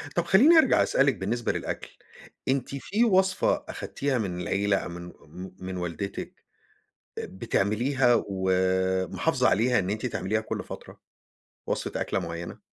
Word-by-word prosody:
طَب 175 -1 +1
خلّيني 275 - +6
أرجَع 290 -5 +5
أسألِك 135 -1 +2
بالنسبة 115 +5 -1
للأكل. - - -4 0.6
أنتِ 135 +1 -1
في 210 - 0
وصفة 190 -2 +2
أخدتيها 140 -2 -2
من 90 -5 -3
العيلة 100 +1 +1
أو - - -4
من 85 0 -8 0.2
م 90 +5 -10
من 95 0 -5
والدتِك 90 +3 -5 0.8
بتعمليها 120 +6 +1
ومحافظة 95 -1 +1
عليها 125 +4 +3
إن 95 0 -1
أنتِ 105 +1 -2
تعمليها - - -1
كلّ - - -5
فترة؟ - - -10 0.7
وصفة - - -2
أكلة - - -1
معينة؟ 85 0 -6
100 Hz, 130 wpm, -27 LUFS, 95-135 Hz, 0.8 s, خلّيني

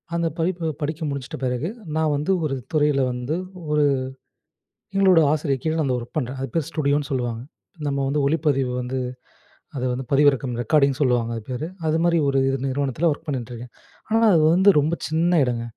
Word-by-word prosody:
அந்த 170 0 +1
படிப்பு 170 0 -1
படிச்சு 155 +2 -3
முடிச்சிட்ட 140 -2 -5
பிறகு 125 +6 -1 0.3
நான் 155 -2 +1
வந்து, 150 +7 -1
ஒரு 140 -3 -1 0.2
துறையில 150 -2 +3
வந்து 125 +5 -3 0.4
ஒரு 150 0 +3 1.1
எங்களோட 190 -4 +5
ஆசிரியர் 140 -4 -1
கீழ 160 - 0
நான் 155 - +1
அந்த 130 - +1
ஒர்க் 120 +7 -12
பண்றேன். 130 -3 -2
அது 135 - -3
பேர் 160 -3 0
ஸ்டுடியோன்னு 145 -2 0
சொல்லுவாங்க. 120 -3 -2 0.5
நம்ம 140 -1 -1
வந்து 145 +2 0
ஒளிப்பதிவு 140 -4 +1
வந்து 125 +1 -3 0.8
அத 125 - -3
வந்து 130 +1 -4
பதிவிறக்கம் 135 -3 +3
ரெக்கார்டிங் 140 -1 +3
சொல்லுவாங்க 120 -4 +2
அது 115 - -6
பேரு. 130 +5 -3 0.2
அதுமாரி 165 +2 +2
ஒரு 135 -1 +2
இது 135 - +1
நிறுவனத்தில 140 +4 0
வொர்க் 155 +2 -5
பண்ணின்ட்ருக்கேன். 125 -3 -5 0.4
ஆனா 225 +1 +3
அது 160 - +4
வந்து 190 +2 +6
ரொம்ப 155 +4 0
சின்ன 165 +2 +2
இடங்க. 120 -2 -2
145 Hz, 170 wpm, -23 LUFS, 130-160 Hz, 1.1 s, வந்து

